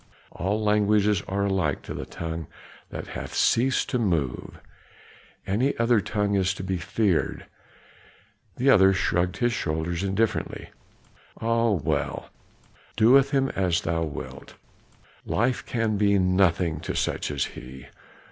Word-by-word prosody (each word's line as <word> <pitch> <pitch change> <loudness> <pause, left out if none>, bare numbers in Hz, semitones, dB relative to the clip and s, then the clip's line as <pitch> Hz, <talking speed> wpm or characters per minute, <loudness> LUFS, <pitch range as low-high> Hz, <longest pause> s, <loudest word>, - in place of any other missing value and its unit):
All 100 +5 -1
languages 105 -1 +3
are 100 +1 -1
alike 95 -7 0
to - - -6
the - - -6
tongue 80 -2 -5 0.4
that - - -7
hath - - -6
ceased 130 +3 +2
to 125 - +1
move; 85 - -2 0.9
any 120 +9 0
other 115 -2 +3
tongue 105 -1 -1
is 95 -1 +1
to 95 - -6
be 95 0 -2
feared." 100 0 0 1.1
The 135 +2 +4
other 95 -4 +6
shrugged 90 -1 0
his 120 -1 +1
shoulders 85 0 -2
indifferently. 100 +3 -1 0.7
"Ah 115 +1 +1
well, 95 -9 -2 0.6
do 110 +2 +5
with 135 +1 +6
him 135 -2 +1
as 90 -3 0
thou 80 0 -1
wilt; 80 -3 -7 0.7
life 125 +4 0
can 115 -3 0
be 100 0 +3
nothing 90 -4 +2
to - - -5
such - - -1
as 70 -2 -1
he. 65 0 -10
100 Hz, 135 wpm, -25 LUFS, 85-115 Hz, 1.1 s, other